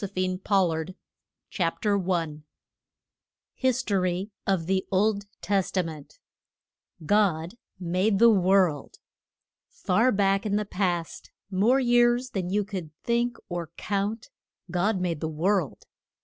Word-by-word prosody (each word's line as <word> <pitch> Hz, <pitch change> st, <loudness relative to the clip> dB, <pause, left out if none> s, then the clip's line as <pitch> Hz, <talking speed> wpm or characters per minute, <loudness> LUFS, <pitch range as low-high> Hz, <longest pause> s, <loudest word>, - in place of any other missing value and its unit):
THE 200 Hz, -, -2 dB
LAND 185 Hz, 0 st, -1 dB
OF -, -, -10 dB, 0.2 s
LIGHT, 160 Hz, +2 st, -4 dB, 0.6 s
412 175 Hz, -4 st, 0 dB, 1.1 s
History 200 Hz, -7 st, 0 dB, 0.2 s
of 190 Hz, -5 st, +1 dB
the 190 Hz, +1 st, 0 dB
Old 200 Hz, +1 st, +1 dB, 0.2 s
Testament. 180 Hz, -6 st, -2 dB, 0.8 s
CHAPTER -, -, -16 dB
I. -, -, -10 dB
GOD 190 Hz, -1 st, +1 dB, 0.2 s
MADE 185 Hz, +4 st, +1 dB
THE 235 Hz, +2 st, +7 dB
WORLD. 185 Hz, -6 st, +2 dB, 0.7 s
FAR 225 Hz, +8 st, +1 dB
back 195 Hz, -1 st, +2 dB
in 205 Hz, -, 0 dB
the 210 Hz, 0 st, 0 dB
past, 180 Hz, -4 st, -2 dB, 0.2 s
more 220 Hz, +8 st, +3 dB
years 240 Hz, 0 st, +3 dB
than 185 Hz, -3 st, -3 dB
you 205 Hz, +2 st, +1 dB
could 190 Hz, -6 st, -6 dB
think 235 Hz, 0 st, 0 dB
or 175 Hz, -2 st, -4 dB
count, 205 Hz, +2 st, -3 dB, 0.4 s
God 185 Hz, +3 st, +1 dB
made 175 Hz, -4 st, -2 dB
the 160 Hz, -, -2 dB
world. 165 Hz, -, -1 dB
190 Hz, 120 wpm, -26 LUFS, 175-210 Hz, 1.1 s, THE